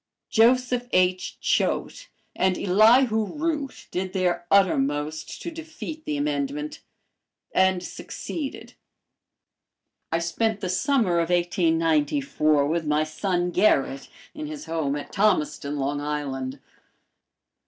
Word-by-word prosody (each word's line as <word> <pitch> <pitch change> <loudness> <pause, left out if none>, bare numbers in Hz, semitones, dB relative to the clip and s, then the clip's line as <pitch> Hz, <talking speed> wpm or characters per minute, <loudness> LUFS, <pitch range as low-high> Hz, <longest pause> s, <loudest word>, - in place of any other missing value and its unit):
Joseph 245 +1 +3
H. 185 0 +1
Choate - - 0 0.3
and 185 -1 +1
Elihu 220 +4 +4
Root 300 -3 -3
did 185 +1 -3
their 175 -2 0
uttermost 155 -5 +1
to 340 - -4
defeat 320 -1 -8
the 300 -1 -2
amendment, 295 +1 -2 0.7
and 190 -1 +3
succeeded. 280 - -6 1.4
I 165 - +2
spent 200 +6 -1
the 190 -2 -3
summer 185 - +2
of 165 0 0
1894 160 -4 +2
with 160 +1 -1
my 150 +1 +2
son 175 +3 -1
Gerrit, 140 -8 +2 0.2
in 305 0 -6
his 300 -1 -7
home 160 -4 -1
at 145 - -7
Thomaston, 155 -8 +1
Long 145 +1 -1
Island. 140 -3 -3
185 Hz, 110 wpm, -25 LUFS, 155-250 Hz, 1.4 s, Elihu